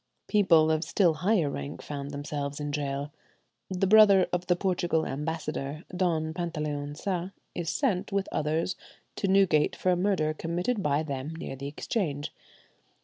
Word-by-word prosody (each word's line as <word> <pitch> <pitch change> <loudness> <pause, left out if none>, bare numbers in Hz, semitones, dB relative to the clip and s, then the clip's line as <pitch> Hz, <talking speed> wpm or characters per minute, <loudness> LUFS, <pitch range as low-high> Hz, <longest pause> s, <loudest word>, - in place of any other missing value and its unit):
People 170 -7 +5
of 155 0 +1
still 170 +1 +3
higher 180 0 +2
rank 140 0 -5
found 140 -1 -5
themselves 145 0 -4
in 145 0 -3
gaol. 140 0 -3 0.6
The 185 0 0
brother 200 -2 +7
of 180 0 -1
the 180 - +4
"Portugal" 175 -3 0
ambassador, 150 0 -4
Don 160 -3 0
Pantaleon 150 -4 -3
Sa, 185 -1 -2 0.2
is 170 -2 -3
sent, 205 -9 0
with 195 0 0
others, 160 +4 0 0.4
to 200 - 0
Newgate 190 -6 +4
for 185 - +1
a - - +3
murder 175 -4 +1
committed 175 +8 -2
by 150 -2 +1
them 140 +1 -4
near 165 -4 -6
the 140 +1 -6
Exchange. 145 -1 -3
160 Hz, 150 wpm, -28 LUFS, 145-185 Hz, 0.6 s, brother